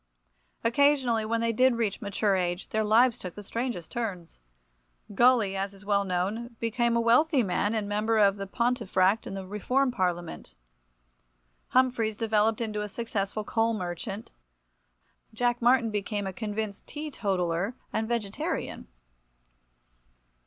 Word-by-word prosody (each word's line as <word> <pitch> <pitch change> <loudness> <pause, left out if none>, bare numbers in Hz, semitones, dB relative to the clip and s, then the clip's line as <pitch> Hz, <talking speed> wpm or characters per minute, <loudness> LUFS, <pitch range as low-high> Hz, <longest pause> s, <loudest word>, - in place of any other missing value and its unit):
Occasionally, 245 -2 +3
when 230 +1 0
they 230 0 +1
did 255 +2 +4
reach 225 -4 -1
mature 200 0 +1
age, 175 0 -2
their 220 0 0
lives 235 +3 +4
took 180 -2 -7
the 205 - -8
strangest 230 -5 -4
turns. 190 - -5 0.7
Gully, 235 -3 +4
as 195 +1 -3
is 195 +1 -16
well 200 -1 +2
known, 200 +6 -2
became 235 +1 +1
a - - +3
wealthy 250 +4 +4
man, 205 +2 0
and 210 -2 -1
Member 210 0 +3
for 200 0 -6
Pontefract 225 -3 +1
in - - -5
the 190 -1 -5
Reform 250 +7 0
Parliament. 175 - -3 1.1
Humphries 245 -4 +2
developed 220 0 +1
into 215 -2 -2
a 210 - -4
successful 215 -2 -3
coal 225 +2 +1
merchant. 195 +4 -5 1.0
Jack 240 +1 +1
Martin 240 -1 +4
became 205 0 -2
a 190 - -4
convinced 210 0 -4
teetotaller 200 - -2 0.2
and 220 0 -1
vegetarian. 220 -4 -3
215 Hz, 130 wpm, -28 LUFS, 195-235 Hz, 1.1 s, did